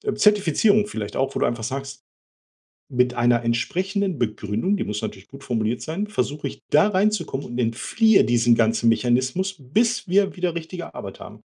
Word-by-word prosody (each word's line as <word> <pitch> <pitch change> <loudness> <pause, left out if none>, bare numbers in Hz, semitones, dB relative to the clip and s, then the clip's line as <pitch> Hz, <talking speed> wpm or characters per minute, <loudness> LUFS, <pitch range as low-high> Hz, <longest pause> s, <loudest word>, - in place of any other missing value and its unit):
Zertifizierung 210 +1 +3
vielleicht 105 - -6
auch, 135 +1 0
wo - - -1
du - - +2
einfach 120 -1 -2
sagst: 135 +2 -5 0.9
„Mit 125 0 +1
einer 120 0 +2
entsprechenden 185 - -1
Begründung“, 110 - -1
die - - -2
muss 105 0 -3
natürlich 95 0 -7
gut 135 0 -13
formuliert 115 0 -1
sein, 165 - -3
„versuche 145 -6 -2
ich - - -11
da 155 +7 +5
reinzukommen 190 -8 0
und 120 0 -6
entfliehe 160 - +3
diesem 120 0 +3
ganzen 115 0 +2
Mechanismus, 130 +12 0
bis 215 - 0
wir 195 +2 +2
wieder 180 -2 -1
richtige 170 +1 -7
Arbeit 100 -1 -8
haben.“ - - -11
135 Hz, 165 wpm, -23 LUFS, 120-190 Hz, 0.9 s, da